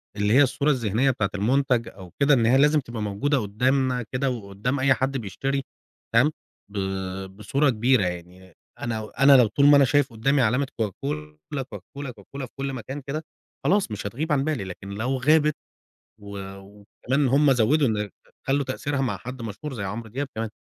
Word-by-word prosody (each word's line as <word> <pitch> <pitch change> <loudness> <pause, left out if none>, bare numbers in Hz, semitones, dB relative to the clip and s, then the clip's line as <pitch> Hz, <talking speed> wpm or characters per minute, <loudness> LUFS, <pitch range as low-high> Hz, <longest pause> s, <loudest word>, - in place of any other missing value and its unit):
اللي 105 +1 +1
هي 135 - +7
الصورة 140 +3 +1
الذهنية 125 +1 +1
بتاعة 100 -5 -1
المنتَج 125 +2 +1
أو 95 -3 -12
كده، 145 +1 +5
إن 115 -4 +3
هي 125 +3 +5
لازم 150 +2 +5
تبقى 120 -5 -6
موجودة 105 +8 0
قُدّامنا 125 +4 +1
كده، 135 +2 0
وقُدّام 115 +3 -3
أي 130 0 +4
حد 135 +1 -1
بيشتري، 135 +5 -2 0.5
تمام، 130 +7 +5 0.4
ب 105 - -7 0.6
بصورة 135 +8 +1
كبيرة 120 0 +3
يعني، 90 +1 -7 0.3
أنا 110 -2 -4
أنا 140 -1 +8
لو 120 -3 +5
طُول 140 +7 +2
ما 145 0 +8
أنا 140 - +6
شايف 145 0 +2
قُدّامي 135 +5 +1
علامة 125 +4 +2
Coca 110 - +2 0.2
Cola، 75 - -5
Coca 100 - -8 0.2
Cola، 140 -1 -4
Coca 105 -4 -16
Cola 135 -2 -3
في - - -16
كلّ 135 0 -3
مكان 130 +4 -6
كده، 150 +4 -4 0.4
خلاص 195 - +2
مش 100 -1 -4
هتغيب 150 +10 -4
عن 140 -2 +2
بالي، 150 -8 -1
لكن 95 +1 -8
لو 115 +7 -2
غابت، 150 +3 +3 0.7
و 100 -1 -8 0.2
وكمان 105 +8 -3
هم 140 +2 +4
زوّدوا 130 +4 +3
إن 105 -2 -1 0.2
خ - - -24 0.2
خلّوا 140 +1 +2
تأثيرها 140 +2 -2
مع 120 -7 -1
حد 125 +5 -8
مشهور 115 +6 -6
زي 105 -4 -4
عمرو 110 +4 -5
دياب 135 +5 -3
كمان، 110 -1 -2
125 Hz, 190 wpm, -25 LUFS, 105-140 Hz, 0.7 s, أنا